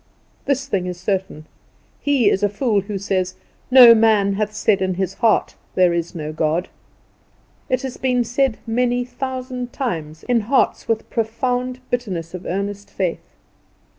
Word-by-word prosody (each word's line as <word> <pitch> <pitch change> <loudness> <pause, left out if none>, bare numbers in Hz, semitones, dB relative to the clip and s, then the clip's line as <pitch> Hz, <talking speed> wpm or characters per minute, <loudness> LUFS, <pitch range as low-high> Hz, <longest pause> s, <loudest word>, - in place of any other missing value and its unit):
This 275 -1 0
thing 195 -9 -1
is 180 -1 -5
certain 190 -5 -3 0.6
he 280 -6 +2
is 195 - +3
a 205 - +2
fool 210 0 +1
who 200 +1 -5
says, 185 -1 -1 0.3
"No 250 -2 +10
man 215 -3 +3
hath 210 +1 -1
said 215 -2 +1
in 185 -1 0
his 190 +1 -2
heart, 225 +1 +2 0.2
There 180 -2 +4
is 170 0 -3
no 155 -1 -5
God." 160 +3 0 1.0
It 255 0 0
has 260 -2 -5
been 250 -2 +1
said 245 0 0
many 245 +1 0
thousand 250 0 -5
times 160 - -4
in 245 -2 +2
hearts 235 +6 +1
with 225 -1 -1
profound 250 +3 -1
bitterness 185 -9 -3
of 180 -1 -7
earnest 200 +2 -3
faith. 185 -4 -4
215 Hz, 155 wpm, -20 LUFS, 185-250 Hz, 1.0 s, No